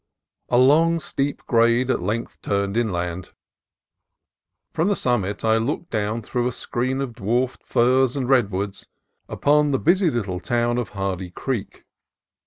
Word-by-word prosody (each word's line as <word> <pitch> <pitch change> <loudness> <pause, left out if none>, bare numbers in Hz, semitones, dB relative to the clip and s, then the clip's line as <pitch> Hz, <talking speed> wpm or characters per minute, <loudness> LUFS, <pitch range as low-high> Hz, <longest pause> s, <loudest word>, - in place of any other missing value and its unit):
A 120 - +3
long 160 +6 +4
steep 140 -2 -3
grade 120 +2 +3
at - - -1
length 110 +6 -3
turned 100 0 -1
inland. 90 -6 -2 1.4
From 165 - +1
the 205 - +2
summit 105 - -1
I 110 0 +4
looked 140 +9 -3
down 110 +1 -2
through 120 +2 -1
a - - -1
screen 130 +3 -2
of 130 -4 -4
dwarfed 120 +4 -1
firs 130 +2 +2
and 130 -3 -1
redwoods 100 -6 0 0.4
upon 150 +1 +2
the 135 - +1
busy 175 +5 +3
little 100 -9 -2
town 120 +4 0
of 120 - -3
Hardy 95 -2 -3
Creek. 115 +4 -5
120 Hz, 145 wpm, -23 LUFS, 105-130 Hz, 1.4 s, long